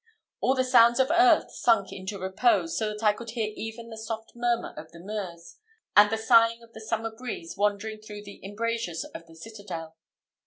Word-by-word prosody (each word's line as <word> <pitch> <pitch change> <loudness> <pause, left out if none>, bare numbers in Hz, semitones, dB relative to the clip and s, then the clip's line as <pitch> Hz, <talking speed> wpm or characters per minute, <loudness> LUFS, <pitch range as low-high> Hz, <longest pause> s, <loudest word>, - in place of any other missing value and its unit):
All 260 - +2
the 260 - +2
sounds 240 -1 +5
of 265 +3 +3
earth 345 -1 +5
sunk 225 -5 +2
into 190 +1 -6
repose, 315 - +1
so 220 - 0
that 210 +1 -7
I 210 -1 +5
could 235 +2 -9
hear 220 -2 -3
even 225 +1 -7
the 220 - -8
soft 220 0 -6
murmur 240 0 -1
of 160 - -10
the 170 - -13
Meuse, 180 -3 -7 0.4
and 205 0 +8
the 225 - -1
sighing 230 +1 +4
of 230 0 -19
the 220 - -10
summer 225 0 -2
breeze 220 -8 -6
wandering 210 +1 -1
through 210 -1 -9
the 200 -1 -12
embrazures 210 -3 -3
of 165 - -9
the 165 - -16
citadel. 170 -4 -8
220 Hz, 195 wpm, -27 LUFS, 200-230 Hz, 0.4 s, and